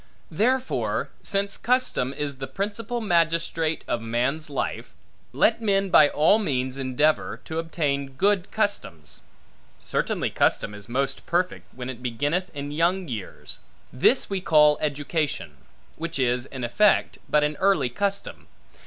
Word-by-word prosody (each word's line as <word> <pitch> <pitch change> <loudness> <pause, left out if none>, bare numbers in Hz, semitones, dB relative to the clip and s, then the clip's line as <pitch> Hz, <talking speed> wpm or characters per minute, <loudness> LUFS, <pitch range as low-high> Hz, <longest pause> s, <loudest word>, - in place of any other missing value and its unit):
Therefore, 255 +9 0
since 200 0 -1
custom 250 - +1
is 140 -1 -4
the 135 0 -5
principal 210 +4 -3
magistrate 165 -4 +1
of 120 - -1
man's 125 +7 -1
life, 140 - -4 0.4
let 230 0 +2
men 195 -3 +1
by 150 -4 +7
all 160 +8 +4
means 130 -9 -1
endeavor, 135 +3 0
to 160 0 -3
obtain 140 -4 -2
good 195 +4 +1
customs. 90 - -2 0.6
Certainly - - -1
custom 105 - +1
is 105 +1 -8
most 135 +2 -2
perfect, 170 - -1
when 125 0 -6
it 130 -2 -7
beginneth 145 +10 -1
in 145 0 -5
young 175 +4 +1
years: 110 -8 -7 0.3
this 140 - +3
we 195 -2 -2
call 150 -3 +5
education; 145 - -2 0.4
which 165 -1 -4
is, 125 -1 +1
in 130 -2 -7
effect, 195 - +2
but 150 0 +3
an 150 0 0
early 185 -10 +2
custom. 200 +8 -3
150 Hz, 135 wpm, -25 LUFS, 130-190 Hz, 0.6 s, by